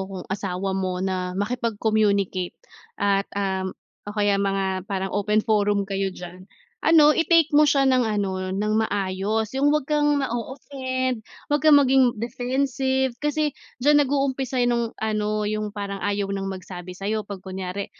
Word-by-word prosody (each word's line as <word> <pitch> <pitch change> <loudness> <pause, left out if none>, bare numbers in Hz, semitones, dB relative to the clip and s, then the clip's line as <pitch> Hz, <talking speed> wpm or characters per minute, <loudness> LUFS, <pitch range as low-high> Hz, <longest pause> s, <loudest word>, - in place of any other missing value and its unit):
kung 185 -2 -6
asawa 190 -1 -2
mo 185 -1 -2
na 185 -1 -2
makipag-communicate 205 -4 0 0.4
at, 200 0 +1
um, 190 -2 -1 0.4
o - - -4
kaya 205 -1 +3
mga 195 -1 -1
parang 190 0 -2
open 210 +1 +2
forum 205 -2 +2
kayo 195 0 -1
diyan. 180 0 -10 0.4
Ano 305 -2 +6
i-take 330 -2 +3
mo 300 - +7
siya 275 -2 +4
ng 255 -1 +4
ano 195 -4 -1
ng 210 +3 -1
maayos, 205 +2 -1
'yung 280 +2 +3
huwag 300 -2 +1
kang 295 -1 +2
ma-o-offend, 260 -1 -3 0.2
huwag 295 -1 0
kang 305 -2 +7
maging 265 -2 +4
defensive 260 +2 -1
kasi 295 -1 0 0.2
diyan 290 +3 +5
nag-uumpisa 270 -2 -1
nung 235 -1 0
ano 215 -1 -1
'yung 215 0 -2
parang 200 -1 -5
ayaw 205 0 0
ng 195 0 -3
magsabi 185 -1 -8
sa'yo 215 +2 -1
'pag 200 -2 -7
kunyari 190 +1 -5
210 Hz, 145 wpm, -24 LUFS, 195-265 Hz, 0.4 s, mo